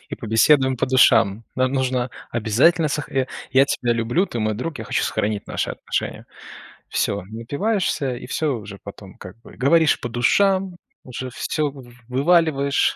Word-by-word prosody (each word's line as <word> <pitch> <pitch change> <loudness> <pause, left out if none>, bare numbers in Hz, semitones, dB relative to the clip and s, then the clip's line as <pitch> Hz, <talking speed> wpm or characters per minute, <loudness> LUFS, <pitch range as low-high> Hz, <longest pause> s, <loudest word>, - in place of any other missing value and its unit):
и - - -4
побеседуем 130 +4 +3
по 115 - 0
душам". 115 -4 +4
Нам 130 0 +1
нужно 130 -2 -1 0.2
обязательно 130 +9 +2
сох 150 -1 -3 0.4
"Я 135 +2 +6
тебя 120 -3 0
люблю, 120 - +1
ты 120 - -5
мой 110 -1 0
друг, 140 +8 -5
я - - -6
хочу - - -1
сохранить 105 -1 -2
наши - - -2
отношения". - - -4 0.6
Всё, 100 -1 -1
напиваешься 140 - -2
и - - -9
всё 145 0 -1
уже 105 -2 -9
потом, 100 -1 -11
как 90 -2 -11
бы, - - -15
говоришь 155 +4 +3
по - - -4
душам, 185 - +2 0.3
уже 130 0 -6
всё 150 +3 -2 0.4
вываливаешь, 140 0 +2
130 Hz, 155 wpm, -22 LUFS, 115-150 Hz, 0.6 s, Я